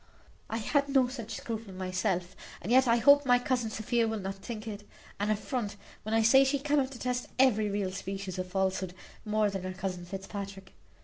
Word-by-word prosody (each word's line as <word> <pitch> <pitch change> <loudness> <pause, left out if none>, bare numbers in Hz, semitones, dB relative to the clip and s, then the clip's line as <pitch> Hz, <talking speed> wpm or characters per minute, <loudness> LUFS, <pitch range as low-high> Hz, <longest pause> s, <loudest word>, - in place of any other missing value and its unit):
I 225 - -2
had 280 +5 +1
no 265 -2 +4
such 235 -4 -6
scruple 220 -4 -5
myself; 185 -1 -1 0.2
and 200 - -5
yet 260 +1 +6
I 230 - +5
hope 285 +5 +6
my 245 -2 +5
cousin 245 -2 0
Sophia 225 +2 0
will 220 0 -1
not 195 0 -3
think 215 +3 -7
it 205 -1 -6 0.4
an 205 +1 0
affront 215 0 -2 0.3
when 220 +1 -2
I 225 - +4
say 265 +5 +7
she 270 +1 +2
cannot 280 -1 +1
detest 250 -1 -3
every 220 -5 +4
real 200 -2 -1
species 195 -1 -5
of 185 - -2
falsehood 190 -1 -1 0.3
more 210 -1 +2
than 195 -1 -3
her 185 0 -4
cousin 185 -2 -4
Fitzpatrick. 195 0 -7
215 Hz, 190 wpm, -30 LUFS, 195-245 Hz, 0.4 s, say